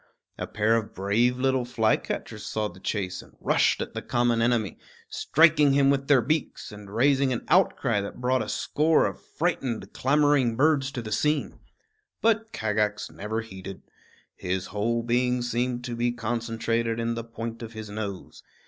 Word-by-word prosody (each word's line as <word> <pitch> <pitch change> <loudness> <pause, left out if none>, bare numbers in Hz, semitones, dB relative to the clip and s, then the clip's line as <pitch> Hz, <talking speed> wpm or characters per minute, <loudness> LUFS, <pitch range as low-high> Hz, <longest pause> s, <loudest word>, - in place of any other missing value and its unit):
A - - -3
pair 110 +2 +2
of 110 -2 -5
brave 110 +6 +1
little 130 0 +1
flycatchers 115 -3 -1
saw 110 -1 -2
the 95 - -14
chase 95 -2 -3
and - - -19
rushed - - +2
at - - -10
the - - -4
common 120 -1 +1
enemy, 115 -3 0 0.3
striking 150 -2 +4
him 140 0 +4
with 135 0 -1
their 135 -5 +5
beaks, 155 +5 -2
and 105 -1 -11
raising 135 +5 +2
an 120 - -3
outcry 130 - +3
that 100 - -7
brought 125 +1 +1
a - - -4
score 155 +2 +2
of - - -4
frightened, 135 -9 -3
clamoring 140 -3 +2
birds 140 0 +2
to 120 - -4
the 110 - -7
scene. 150 +6 0 0.6
But 225 0 +1
Kagax 105 -1 -1
never 110 +3 -3
heeded. 95 -3 -9 0.5
His 95 +1 -3
whole 115 +3 0
being 125 +1 +1
seemed 120 0 -1
to 120 -1 -4
be 120 +1 +1
concentrated 115 0 -2
in 115 0 -1
the 115 0 -4
point 115 0 -7
of 115 0 -7
his 110 -1 -8
nose. 100 -3 -6
120 Hz, 165 wpm, -26 LUFS, 110-135 Hz, 0.6 s, their